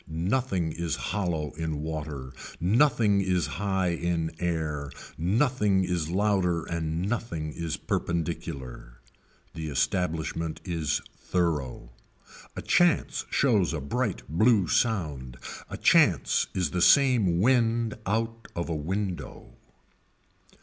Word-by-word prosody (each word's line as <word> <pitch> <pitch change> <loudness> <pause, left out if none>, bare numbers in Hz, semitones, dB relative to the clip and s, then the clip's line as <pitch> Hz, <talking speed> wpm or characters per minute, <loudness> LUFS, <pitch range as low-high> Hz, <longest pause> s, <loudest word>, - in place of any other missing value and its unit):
Nothing 90 +1 -1
is 85 -2 -2
hollow 85 -8 -2
in 80 -1 -4
water, 75 -4 -5 0.3
nothing 105 - +3
is 90 -4 +1
high 95 -2 -1
in 85 -1 -1
air, 80 -5 -2 0.2
nothing 105 - +2
is 90 -3 -1
louder 90 -3 +1
and 80 0 -2
nothing 85 -10 -3
is 85 -2 -3
perpendicular. 70 -8 -4 0.5
The 80 -1 -5
establishment 80 +1 -1
is 85 -5 -1
thorough. 75 -9 -2 0.6
A - - -5
chance 175 -3 +2
shows 105 -11 +2
a - - -2
bright 105 - -2
blue 100 - +3
sound, 75 - 0 0.3
a - - -5
chance - - +4
is 90 -5 0
the 90 - -1
same 120 - +5
wind 115 0 +2
out 115 +2 -1
of 85 0 -3
a 85 - -1
window. 85 -3 -4
85 Hz, 110 wpm, -27 LUFS, 80-105 Hz, 0.6 s, same